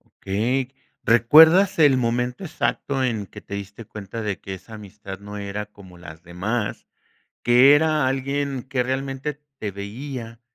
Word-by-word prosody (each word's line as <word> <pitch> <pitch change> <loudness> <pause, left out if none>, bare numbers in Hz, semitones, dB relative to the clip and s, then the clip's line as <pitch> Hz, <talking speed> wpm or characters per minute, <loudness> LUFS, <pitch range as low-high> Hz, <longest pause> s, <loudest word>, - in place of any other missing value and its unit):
Okey, 125 +7 -2 0.3
¿recuerdas 160 - +6
el 145 -4 +6
momento 125 +4 -1
exacto 140 -4 -1
en 110 -5 -1
que - - -12
te - - -9
diste 100 +3 -7
cuenta 105 +2 -7
de 100 -5 -3
que 95 - -6
esa 95 +4 -12
amistad 100 -2 -9
no 100 +1 -9
era 100 +1 -5
como 95 -4 -16
las 80 -2 -12
demás?, 100 +6 -3 0.6
que 125 +4 +7
era 155 -2 +2
alguien 135 0 -2
que 130 -1 -1
realmente 135 +3 -3 0.2
te 105 - -3
veía 115 +4 -7
115 Hz, 150 wpm, -23 LUFS, 100-135 Hz, 0.6 s, que